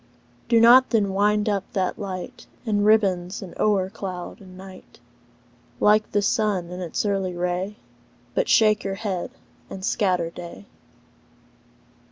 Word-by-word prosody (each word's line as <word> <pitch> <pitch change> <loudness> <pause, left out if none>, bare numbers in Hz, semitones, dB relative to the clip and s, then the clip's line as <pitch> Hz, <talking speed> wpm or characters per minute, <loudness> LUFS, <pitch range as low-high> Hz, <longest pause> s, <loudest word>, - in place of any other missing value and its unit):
Do 230 -1 +5
not, 245 +3 +7
then, 205 -4 +1
wind 210 +2 +2
up 200 -2 0
that 185 -2 -1
light 200 +5 -7 0.2
In 205 -2 +1
ribbons, 200 -3 +2
and 185 - -10
o'er 200 -3 +2
cloud 185 -2 -7
in 185 -1 -14
night, 190 0 -13 0.8
Like 210 +1 +3
the 205 0 +1
sun 200 -4 0
in's 180 +2 -3
early 195 -3 -1
ray; 180 +3 -2 0.6
But - - 0
shake 215 -1 +4
your 195 - -3
head 195 -4 -4 0.4
and 190 0 -6
scatter 180 -7 0
day. 175 +3 -10
195 Hz, 135 wpm, -23 LUFS, 185-210 Hz, 0.8 s, not